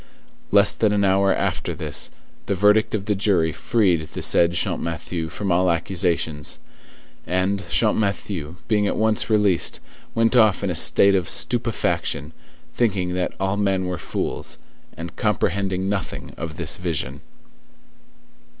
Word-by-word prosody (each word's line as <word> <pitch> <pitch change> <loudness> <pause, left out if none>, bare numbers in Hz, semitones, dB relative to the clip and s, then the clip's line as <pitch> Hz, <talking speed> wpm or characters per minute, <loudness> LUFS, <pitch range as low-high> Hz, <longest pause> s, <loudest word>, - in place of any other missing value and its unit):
Less 100 0 +4
than 105 -2 +1
an 100 -1 +2
hour 95 0 +3
after - - -1
this, - - -3 0.4
the 100 - 0
verdict 105 +3 +3
of 100 -2 -3
the 105 - +1
jury 95 -5 +1
freed 90 -9 +1
the - - -4
said 85 0 +4
Champmathieu 85 -1 -2
from 100 +3 -3
all 90 +1 +3
accusations; 85 -3 -1 0.7
and 95 +3 +1
Champmathieu, 100 -7 0
being 105 -2 +2
at - - -1
once 110 0 +1
released, 105 -5 +2 0.4
went 115 +2 +2
off 110 -5 +4
in 100 - 0
a - - -3
state 100 +4 +4
of 95 -3 +1
stupefaction, 115 - 0 0.4
thinking 95 -6 0
that 90 0 -1
all 95 +1 0
men 95 -2 +1
were 90 -1 -3
fools, - - -4 0.4
and 85 0 -7
comprehending 95 -2 0
nothing 100 0 -4
of 80 -1 -6
this 85 -4 -3
vision. 80 -6 -3
95 Hz, 140 wpm, -22 LUFS, 85-105 Hz, 0.7 s, Less